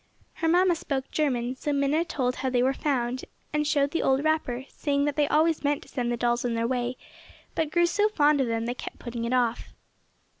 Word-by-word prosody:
Her 330 - 0
mamma 355 +2 +4
spoke 275 -5 -3
German 255 -5 0
so 295 +3 -3
Minna 280 +3 +2
told 255 -6 -2
how 265 - -1
they 250 -1 +2
were 265 +1 +2
found, 255 -3 -1 0.3
and 300 0 +1
showed 285 -2 +2
the 330 - 0
old 270 +1 +2
wrapper, 285 -5 0
saying 285 -1 -1
that 290 -1 -1
they 295 -1 +2
always 315 +1 +2
meant 290 0 0
to - - -18
send 240 -3 -2
the 240 - -1
dolls 240 0 +1
on 240 -2 -1
their 230 0 0
way 245 0 -2 0.6
but 320 -2 0
grew 345 +2 +3
so 415 +5 +2
fond 295 -7 +3
of 260 - +1
them 230 0 -1
they 240 - -1
kept - - -8
putting 235 -1 -5
it 235 - -1
off. 240 -2 0
275 Hz, 225 wpm, -27 LUFS, 245-300 Hz, 0.6 s, mamma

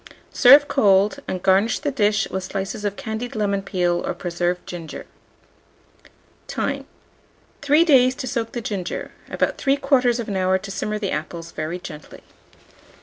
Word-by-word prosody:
Serve 280 +3 +7
cold, 210 -1 +3
and 185 -1 -4
garnish 195 +4 +3
the 290 - -2
dish 215 -4 +1
with 190 0 -3
slices 195 +3 -4
of 205 -1 -2
candied 235 -1 -5
lemon 200 -2 0
peel 175 -2 0
or - - -3
preserved 175 0 -2
ginger. 170 -3 -8 1.4
Time. - - -3 0.7
3 295 +4 +4
days 260 -5 +5
to 260 - -5
soak 230 -3 -3
the 240 - -3
ginger; 195 -5 -4 0.2
about - - -1
3/4 270 -4 +2
hour 185 0 +2
to 195 +1 -8
simmer 210 +2 -3
the 205 -2 -3
apples 165 +2 -5
very 155 +3 -4
gently. 155 -4 -11
205 Hz, 145 wpm, -22 LUFS, 185-245 Hz, 1.4 s, Serve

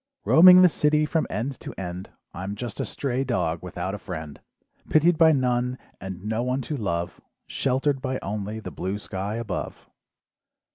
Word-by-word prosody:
"Roaming 185 +2 +9
the - - +9
city 150 -2 +2
from 160 +1 0
end 130 +5 -3
to - - -8
end, 90 0 -6 0.2
"I'm 95 +3 -5
just 120 0 -6
a - - -1
stray 135 -1 -2
dog 85 -11 -1
without 90 +1 -4
a 105 - -5
friend, 80 -6 -7 0.5
"Pitied 160 +3 +4
by 160 0 +6
none 125 -2 +1 0.2
and 95 0 -7
no 110 +2 -1
one 125 +2 -1
to 150 - -4
love, 85 -8 -3 0.2
"Sheltered 135 +1 0
by 130 -1 -2
only 105 +2 -4
the - - -7
blue 95 +2 -3
sky 100 +1 -4
above. 110 -6 -5
115 Hz, 165 wpm, -25 LUFS, 95-135 Hz, 0.5 s, Roaming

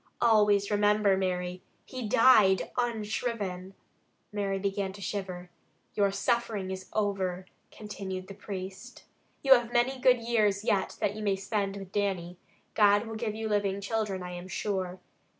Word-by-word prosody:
Always 210 -3 +4
remember, 205 -1 +3
Mary, 180 -1 -2 0.2
he 250 -5 -5
died 210 -5 +5
unshriven!" 210 -5 -2 0.6
Mary 200 -2 -1
began 195 0 -2
to 200 - -11
shiver. 180 -2 -5 0.4
"Your 200 -1 +2
suffering 210 -2 -1
is 190 0 -7
over," 190 -3 -1 0.2
continued 195 -3 -6
the 195 - -8
priest. 195 +3 -8 0.4
"You 270 -1 +8
have 240 -2 +1
many 245 +2 +1
good 250 -1 +5
years 215 -4 +1
yet 200 -3 0
that 205 -1 0
you 215 - -6
may 200 -2 +1
spend 195 0 -2
with 195 -1 -9
Dannie; 185 -4 -2 0.3
God 205 0 +4
will 225 - -6
give 215 -1 -3
you 220 0 -3
living 200 -2 0
children, 200 -2 -2
I 180 - -6
am 175 +1 -7
sure. 185 -1 -3
200 Hz, 150 wpm, -29 LUFS, 190-215 Hz, 0.6 s, You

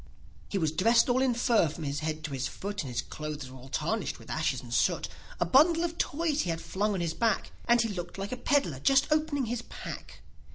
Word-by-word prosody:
e 200 - 0
was 160 -5 +1
dressed 230 +9 +4
all 250 +1 +3
in 265 -1 +3
fur, 235 -6 +3
from 160 +2 -7
his 140 0 -2
head 155 0 -3
to 155 - -4
his 130 -1 -1
foot, 205 +1 -4
And 135 -5 -6
his 120 +1 -1
clothes 150 -4 -6
were 130 - -10
all 130 +2 -12
tarnished 155 - -1
with - - -10
ashes - - 0
and - - -8
soot; - - +2 0.3
A - - +2
bundle 330 +5 +5
of 340 0 -3
Toys 305 0 +1
he - - -2
had 165 -1 -1
flung 205 +4 -1
on 185 - -2
his 165 -2 -1
back, 225 +2 0
And 240 0 +5
he 230 -1 +2
looked 175 -3 -5
like 195 +1 -4
a 255 - -3
peddler 245 - +1
just 275 - +4
opening 305 -3 +1
his 240 +1 -2
pack. - - -9
205 Hz, 240 wpm, -29 LUFS, 155-255 Hz, 0.3 s, bundle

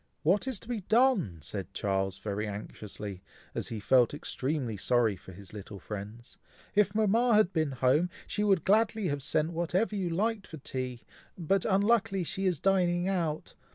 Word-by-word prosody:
"What 190 - +2
is 255 -7 -2
to - - -12
be 240 -4 -2
done!" 220 - +3
said 100 +4 -6
Charles, 95 -1 -1
very 105 +1 -3
anxiously, 105 -1 -7 0.3
as - - -3
he 115 - -5
felt 125 +5 +4
extremely 135 -5 -2
sorry 115 +1 +2
for 95 - -13
his 95 +1 -13
little 100 -1 -8
friends. 105 +4 -8 0.3
"If 205 -1 +3
Mama 220 +2 +3
had 210 -3 +4
been 155 -5 0
at - - -10
home, 150 +7 +4 0.2
she 210 - -2
would 195 -4 +3
gladly 215 -1 +3
have 145 0 -2
sent 150 +3 +1
whatever 175 +6 0
you 190 -3 -1
liked 205 +4 -1
for 160 - -9
tea, 130 -3 -5 0.3
but 185 +2 +1
unluckily 200 -1 +2
she 190 +3 -1
is 175 -6 +1
dining 180 -1 +2
out! 170 -5 -1
165 Hz, 175 wpm, -30 LUFS, -, 0.3 s, felt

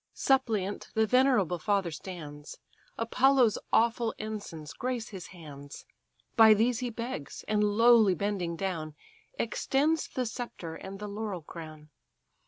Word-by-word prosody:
Suppliant 220 -7 0
the 220 0 +4
venerable 235 - +3
father 195 -1 0
stands; 150 -4 -8 0.4
Apollo's 250 0 +3
awful 230 0 +2
ensigns 205 -8 -6
grace 245 -2 -3
his 190 -4 -8
hands: 145 -5 -11 0.5
By 220 -2 +8
these 230 +3 +2
he 250 -1 -2
begs; 230 - -6
and 210 -1 +2
lowly 215 -1 +5
bending 185 -3 -2
down, 165 -5 -3 0.4
Extends 305 +4 0
the 255 - -3
sceptre 225 -8 -6
and 190 +4 -8
the 210 +1 -6
laurel 205 -4 -4
crown. 155 -1 -10
210 Hz, 125 wpm, -29 LUFS, 170-235 Hz, 0.5 s, By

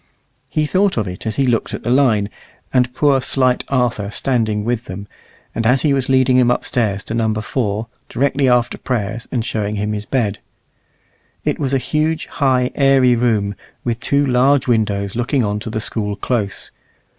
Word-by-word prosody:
He 155 - 0
thought 190 +3 +1
of 105 -3 0
it 90 +5 -6
as 110 - -2
he 135 - +2
looked 120 -3 0
at - - -9
the 120 - -1
line, 115 -7 +3 0.4
and 125 -1 +3
poor 145 +3 +2
little 135 -1 +2
slight 130 -1 +2
Arthur 120 -6 0
standing 110 -3 0
with 120 0 -1
them, 100 +2 -7 0.5
and 115 -1 0
as 125 +2 +3
he 150 -3 +3
was 135 -2 0
leading 130 -1 +4
him 125 -1 +4
upstairs 110 -5 0
to - - -5
Number 110 -2 0
4, 110 -1 -2 0.2
directly 140 +1 +1
after 120 -1 +2
prayers, 115 -1 -3
and 115 -3 -1
showing 105 -3 -2
him 105 +1 -2
his 105 0 -4
bed. 110 -6 0 1.1
It - - 0
was 135 -3 -1
a 135 - +3
huge, 155 +4 -1
high, 130 -2 +1
airy 135 -3 +4
room, 110 -4 +1 0.3
with 120 -1 -2
two 140 +3 +1
large 130 +2 +3
windows 105 -4 0
looking 120 +2 0
on 105 0 -1
to 110 - -6
the 110 - -2
School 105 -2 -2
close. 105 -4 -2
120 Hz, 185 wpm, -18 LUFS, 105-130 Hz, 1.1 s, leading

